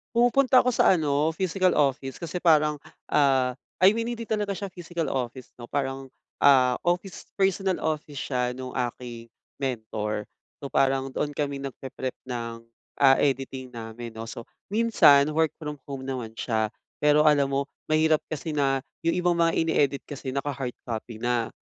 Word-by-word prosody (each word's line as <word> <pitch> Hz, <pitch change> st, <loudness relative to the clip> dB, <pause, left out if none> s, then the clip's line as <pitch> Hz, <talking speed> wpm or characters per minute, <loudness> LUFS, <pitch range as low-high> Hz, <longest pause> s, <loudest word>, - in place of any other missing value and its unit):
Pumupunta 255 Hz, +2 st, +5 dB
ako 250 Hz, -, +1 dB
sa 235 Hz, -, +4 dB
ano, 155 Hz, -1 st, +1 dB
physical 185 Hz, +1 st, +1 dB
office 135 Hz, -1 st, 0 dB
kasi 170 Hz, +1 st, -5 dB
parang, 155 Hz, -3 st, +4 dB, 0.3 s
ah, 130 Hz, -3 st, +3 dB, 0.2 s
I 195 Hz, +4 st, +6 dB
mean, 230 Hz, +1 st, -1 dB
hindi 230 Hz, -1 st, -6 dB
talaga 210 Hz, -2 st, 0 dB
siya 200 Hz, 0 st, -5 dB
physical 175 Hz, -2 st, -4 dB
office, 130 Hz, -1 st, -4 dB
'no, 120 Hz, -, -10 dB
parang, 135 Hz, 0 st, -3 dB, 0.2 s
ah, 130 Hz, -3 st, +5 dB
office 180 Hz, +2 st, -1 dB
personal 195 Hz, -1 st, +1 dB
office 150 Hz, -2 st, -3 dB
siya 125 Hz, -2 st, 0 dB
nung 130 Hz, 0 st, -7 dB
aking 120 Hz, -2 st, -5 dB, 0.2 s
mentor. 110 Hz, -5 st, -3 dB, 0.3 s
So, 140 Hz, -, -5 dB
parang 135 Hz, 0 st, +2 dB
doon 145 Hz, 0 st, -1 dB
kami 140 Hz, -1 st, -3 dB
nag-pre-prep 130 Hz, -1 st, -5 dB, 0.2 s
ng, 115 Hz, -2 st, -4 dB, 0.4 s
ah, 135 Hz, -1 st, +7 dB
editing 130 Hz, -2 st, -1 dB
namin, 115 Hz, 0 st, -7 dB
'no? 115 Hz, 0 st, -7 dB
So, 115 Hz, 0 st, -7 dB, 0.2 s
minsan 175 Hz, -10 st, +5 dB
work 160 Hz, 0 st, +1 dB
from 150 Hz, -3 st, -7 dB
home 135 Hz, -2 st, -5 dB
naman 120 Hz, -4 st, -5 dB
siya. 110 Hz, -2 st, 0 dB, 0.3 s
Pero 150 Hz, +1 st, +5 dB
alam 145 Hz, -2 st, +4 dB
mo, 140 Hz, 0 st, 0 dB, 0.2 s
mahirap 155 Hz, 0 st, +3 dB
kasi 155 Hz, 0 st, -4 dB
na 135 Hz, -2 st, +1 dB, 0.2 s
yung 165 Hz, +1 st, 0 dB
ibang 175 Hz, -1 st, +2 dB
mga 170 Hz, -1 st, +3 dB
ine-edit 140 Hz, -4 st, +1 dB
kasi 140 Hz, -2 st, -8 dB
naka-hard 140 Hz, -2 st, -3 dB
copy 115 Hz, -1 st, -5 dB
na. 120 Hz, -1 st, 0 dB
140 Hz, 160 wpm, -26 LUFS, 125-165 Hz, 0.4 s, ah